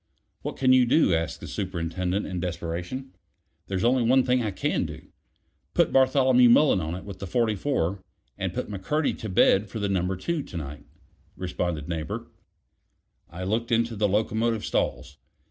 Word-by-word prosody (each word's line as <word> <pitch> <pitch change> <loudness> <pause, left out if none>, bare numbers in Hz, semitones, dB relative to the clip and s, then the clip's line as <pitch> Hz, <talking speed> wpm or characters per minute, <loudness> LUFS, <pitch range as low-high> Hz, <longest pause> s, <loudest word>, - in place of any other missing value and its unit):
"What - - -5
can 130 -1 +4
you 125 -1 +5
do?" 125 - +4
asked 80 0 -1
the - - -7
Superintendent 90 0 -2
in 90 -2 -4
desperation. 90 +9 -4 0.6
"There's 95 0 -2
only 125 +2 +3
one 130 +3 +4
thing 125 0 +2
I 110 - -1
can 95 - -1
do. - - -10 0.7
Put - - +3
Bartholomew 130 -2 +5
Mullen 120 -5 +5
on 80 +2 -3
it 95 - -8
with 100 -2 -8
the 100 - -5
44, 105 - 0 0.3
and - - -3
put - - -4
McCurdy 120 +10 -1
to 110 - -5
bed 95 +2 +4
for 110 - -6
Number 95 -3 0
Two 155 - -2
to 95 - -8
night," 75 -2 -7 0.5
responded 85 -4 -3
Neighbor. 80 -2 -3
It - - -4
was - - -19
eight - - -35 0.9
o'clock. 85 +2 -9
I - - -2
looked 115 +5 -1
into 115 0 +1
the 105 0 +2
locomotive 110 +2 0
stalls. 70 - -2
100 Hz, 180 wpm, -26 LUFS, 90-120 Hz, 0.9 s, you